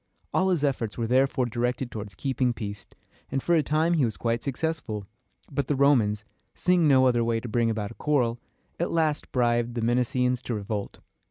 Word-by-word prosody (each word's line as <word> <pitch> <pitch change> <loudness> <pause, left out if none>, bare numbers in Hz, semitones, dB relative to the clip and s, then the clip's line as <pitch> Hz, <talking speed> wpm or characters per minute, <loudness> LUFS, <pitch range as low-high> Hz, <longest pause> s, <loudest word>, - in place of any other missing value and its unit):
All 190 0 +2
his 175 -6 +1
efforts 125 -7 -1
were 115 - -1
therefore 130 +2 +2
directed 120 +1 -2
toward 105 -3 -7
keeping 130 -2 0
peace, 105 -3 -6 0.4
and 135 - -1
for 175 - +2
a 165 - +5
time 155 +3 +1
he 155 -5 +3
was 110 -6 -1
quite 115 +6 -1
successful. 140 -7 -3 0.5
But 140 0 -1
the 145 - +1
Romans, 115 -7 +3 0.3
seeing 180 -3 +3
no 130 -2 +5
other 120 -2 +3
way 115 0 +1
to 120 - -7
bring 115 +1 +1
about 110 -1 -2
a - - -8
quarrel, 120 -4 0 0.4
at 175 - 0
last 155 -3 0
bribed 120 -1 +1
the 120 - -1
Messenians 125 +1 +1
to 120 - -2
revolt. 105 0 -4
125 Hz, 190 wpm, -26 LUFS, 115-140 Hz, 0.5 s, a